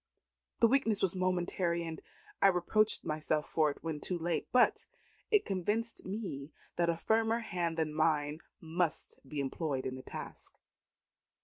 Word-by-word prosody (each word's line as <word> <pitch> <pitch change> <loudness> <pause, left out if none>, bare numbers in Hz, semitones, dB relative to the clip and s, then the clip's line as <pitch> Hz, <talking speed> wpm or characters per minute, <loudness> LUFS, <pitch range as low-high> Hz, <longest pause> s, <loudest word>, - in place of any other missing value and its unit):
The 230 - +8
weakness 225 -5 +3
was 190 -1 +2
momentary, 180 -1 0
and 160 -1 -6 0.4
I - - +7
reproached 195 +4 +3
myself 155 -1 -1
for 155 -2 +2
it 145 - -7
when 160 -2 -3
too 180 +4 -2
late. 170 0 -1
But 250 - +4 0.4
it 425 -3 +4
convinced 210 +5 -1
me 185 -9 -5 0.2
that 170 -1 +2
a 165 - +1
firmer 225 +5 +2
hand 175 -6 -2
than 155 -2 0
mine 155 -1 +1 0.2
must 165 0 -1
be 150 - -4
employed 140 0 -2
in 130 - -2
the 130 - -7
task." - - -8
170 Hz, 150 wpm, -33 LUFS, 155-200 Hz, 0.4 s, The